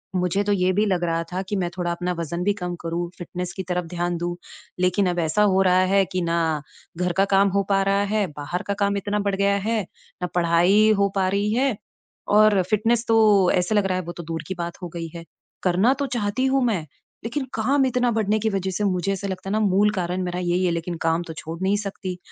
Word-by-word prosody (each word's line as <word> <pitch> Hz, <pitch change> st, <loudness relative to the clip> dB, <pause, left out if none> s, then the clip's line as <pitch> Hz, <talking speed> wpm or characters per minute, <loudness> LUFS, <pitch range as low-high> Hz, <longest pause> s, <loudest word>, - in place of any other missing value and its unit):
मुझे 180 Hz, +2 st, +1 dB
तो 205 Hz, -, 0 dB
ये 185 Hz, -1 st, +2 dB
भी 210 Hz, +3 st, +2 dB
लग 180 Hz, -3 st, 0 dB
रहा 165 Hz, 0 st, 0 dB
था 185 Hz, -, -1 dB
कि 205 Hz, -, -1 dB
मैं 175 Hz, -, -1 dB
थोड़ा 175 Hz, -1 st, -1 dB
अपना 180 Hz, +1 st, -2 dB
वज़न 170 Hz, +2 st, -3 dB
भी 205 Hz, +1 st, +2 dB
कम 175 Hz, 0 st, -3 dB
करूँ, 170 Hz, +1 st, -2 dB
फ़िटनेस 180 Hz, 0 st, -5 dB
की 190 Hz, -, -2 dB
तरफ 180 Hz, -1 st, -1 dB
ध्यान 175 Hz, 0 st, -1 dB
दूँ, 175 Hz, +1 st, -3 dB, 0.4 s
लेकिन 185 Hz, +1 st, +2 dB
अब 175 Hz, 0 st, -1 dB
ऐसा 165 Hz, +6 st, +2 dB
हो 190 Hz, -, +4 dB
रहा 185 Hz, -1 st, +4 dB, 0.2 s
है 195 Hz, -, +5 dB
कि 185 Hz, -1 st, -1 dB
ना 165 Hz, -3 st, 0 dB, 0.4 s
घर 180 Hz, 0 st, 0 dB
का 195 Hz, -, +5 dB
काम 200 Hz, 0 st, +5 dB
हो 200 Hz, -, +2 dB
पा 195 Hz, 0 st, +3 dB
रहा 200 Hz, +1 st, +2 dB
है 210 Hz, -2 st, +2 dB
बाहर 150 Hz, +5 st, -4 dB
का 200 Hz, -, 0 dB
काम 200 Hz, 0 st, +1 dB
इतना 205 Hz, +1 st, -1 dB
बढ़ 200 Hz, -1 st, 0 dB
गया 200 Hz, 0 st, +2 dB
है, 220 Hz, +2 st, 0 dB, 0.4 s
ना 180 Hz, -, -1 dB
पढ़ाई 175 Hz, +5 st, +4 dB
हो 200 Hz, 0 st, +3 dB
पा 190 Hz, -1 st, +2 dB
रही 200 Hz, +2 st, 0 dB
है 260 Hz, -2 st, +1 dB, 0.6 s
और 210 Hz, -2 st, +6 dB
फ़िटनेस 225 Hz, +3 st, +2 dB
तो 225 Hz, -, +3 dB, 0.4 s
ऐसे 180 Hz, +4 st, +1 dB
लग 205 Hz, -2 st, +3 dB
रहा 185 Hz, -1 st, 0 dB
है 185 Hz, -, -3 dB
वो 170 Hz, -, -6 dB
तो 170 Hz, -, -6 dB
दूर 165 Hz, 0 st, -5 dB
की 190 Hz, -, -3 dB
बात 170 Hz, 0 st, -3 dB
हो 175 Hz, -, -4 dB
गई 165 Hz, -1 st, -4 dB
है। 165 Hz, -, -7 dB, 0.4 s
करना 190 Hz, +8 st, +3 dB
तो 280 Hz, -, 0 dB
चाहती 215 Hz, +4 st, 0 dB
हूँ 265 Hz, -1 st, +2 dB
मैं 215 Hz, -7 st, +1 dB, 0.4 s
लेकिन 265 Hz, +4 st, -3 dB
काम 265 Hz, +5 st, +2 dB
इतना 250 Hz, -1 st, +1 dB
बढ़ने 215 Hz, -1 st, +1 dB
की 220 Hz, +1 st, 0 dB
वज़ह 190 Hz, -1 st, -2 dB
से 210 Hz, -, -1 dB
मुझे 185 Hz, 0 st, 0 dB
ऐसे 195 Hz, +1 st, -4 dB
लगता 190 Hz, 0 st, -5 dB
है -, -, -2 dB
ना 215 Hz, -, +2 dB
मूल 200 Hz, +3 st, +3 dB
कारण 180 Hz, +1 st, -1 dB
मेरा 180 Hz, 0 st, -3 dB
यही 180 Hz, +1 st, 0 dB
है 175 Hz, -, +2 dB
लेकिन 170 Hz, +1 st, -3 dB
काम 165 Hz, +1 st, +1 dB
तो 160 Hz, -, -6 dB
छोड़ 165 Hz, +1 st, -6 dB
नहीं 195 Hz, +2 st, +2 dB
सकती। 195 Hz, -3 st, -5 dB
190 Hz, 245 wpm, -23 LUFS, 175-205 Hz, 0.6 s, और